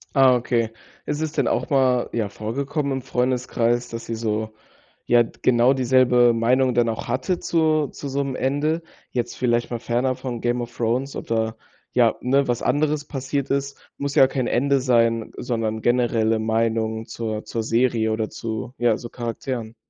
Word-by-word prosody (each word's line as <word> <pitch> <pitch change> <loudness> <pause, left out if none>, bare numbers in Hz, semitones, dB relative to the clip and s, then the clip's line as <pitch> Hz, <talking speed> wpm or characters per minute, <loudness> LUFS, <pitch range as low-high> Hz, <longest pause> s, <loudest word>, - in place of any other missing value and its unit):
Ah, 135 -2 +6
okay. 120 -2 0 0.3
Ist 150 +1 -2
es 160 -1 -1
denn 140 -6 0
auch - - 0
mal, 130 -3 +2
ja 110 -3 -1
vorgekommen 140 +8 -3
im 135 -1 -2
Freundeskreis, 125 -1 0
dass 115 -1 -8
ihr 115 - -2
so 110 -1 -2 0.5
ja, 120 -1 +5
d 115 - -13
genau 125 +1 +4
dieselbe 125 -2 +4
Meinung 125 +3 +2
dann 120 -1 +2
auch 110 - -4
hattet 130 +9 -1
zu 155 -3 +2
zu 140 - -7
so 140 +1 -1
'nem 135 -2 -4
Ende? 145 +6 0 0.3
Jetzt 120 -1 -3
vielleicht 120 -1 0
mal 120 - -2
fernab 125 +2 0
von 120 -3 -5
Game 120 0 0
of 120 0 -7
Thrones 125 +4 -1
oder, 110 -1 -1 0.4
ja, 120 -3 +4
ne, 135 +2 +2
was 120 - 0
anderes 150 +1 +1
passiert 140 0 -3
ist, 140 0 -2 0.2
muss 140 0 -3
ja 135 - +7
kein 130 -2 -2
Ende 140 +2 +2
sein, 115 -3 +2
sondern 115 -3 -2
generelle 115 -2 +2
Meinung 110 0 0
zur 110 -2 -4
zur 115 - -3
Serie 115 -1 +1
oder 110 0 -1
zu, 115 +2 -5
ja, 120 -3 +2
so 120 - -8
Charakteren? 120 -1 -5
120 Hz, 175 wpm, -23 LUFS, 115-135 Hz, 0.5 s, ja